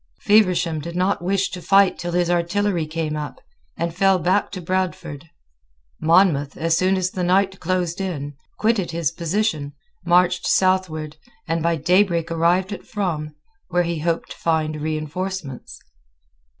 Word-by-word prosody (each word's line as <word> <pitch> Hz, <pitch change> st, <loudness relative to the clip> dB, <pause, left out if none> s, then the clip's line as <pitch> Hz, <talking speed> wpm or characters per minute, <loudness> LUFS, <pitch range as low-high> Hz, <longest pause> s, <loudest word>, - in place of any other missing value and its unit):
Feversham 185 Hz, -6 st, +3 dB
did 170 Hz, +3 st, -7 dB
not 185 Hz, +1 st, +1 dB
wish 195 Hz, +1 st, +1 dB
to 180 Hz, -, -6 dB
fight 195 Hz, +1 st, +4 dB
till 175 Hz, 0 st, -4 dB
his 175 Hz, -1 st, +2 dB
artillery 175 Hz, 0 st, 0 dB
came 155 Hz, -1 st, -3 dB
up, 150 Hz, -1 st, -5 dB, 0.4 s
and 170 Hz, 0 st, -2 dB
fell 195 Hz, 0 st, +4 dB
back 185 Hz, +4 st, +1 dB
to 190 Hz, -, -6 dB
Bradford. 175 Hz, -4 st, -3 dB, 0.7 s
Monmouth, 160 Hz, -4 st, +3 dB
as 165 Hz, 0 st, +1 dB
soon 185 Hz, +3 st, +2 dB
as 185 Hz, 0 st, -1 dB
the 185 Hz, -, -3 dB
night 190 Hz, +2 st, +2 dB
closed 180 Hz, 0 st, -1 dB
in, 145 Hz, -7 st, -4 dB, 0.2 s
quitted 215 Hz, -4 st, +1 dB
his 165 Hz, -3 st, -1 dB
position, 165 Hz, -3 st, -1 dB, 0.3 s
marched 180 Hz, +1 st, +3 dB
southward, 165 Hz, -5 st, +1 dB, 0.3 s
and 165 Hz, +1 st, 0 dB
by 170 Hz, +1 st, +1 dB
daybreak 170 Hz, +1 st, +2 dB
arrived 175 Hz, +4 st, +1 dB
at -, -, -9 dB
Frome, 160 Hz, -7 st, -3 dB, 0.3 s
where 180 Hz, 0 st, +1 dB
he 170 Hz, -2 st, -2 dB
hoped 165 Hz, +1 st, -2 dB
to -, -, -8 dB
find 155 Hz, -2 st, -1 dB
reinforcements. 155 Hz, -1 st, -4 dB
175 Hz, 150 wpm, -22 LUFS, 160-185 Hz, 0.7 s, fight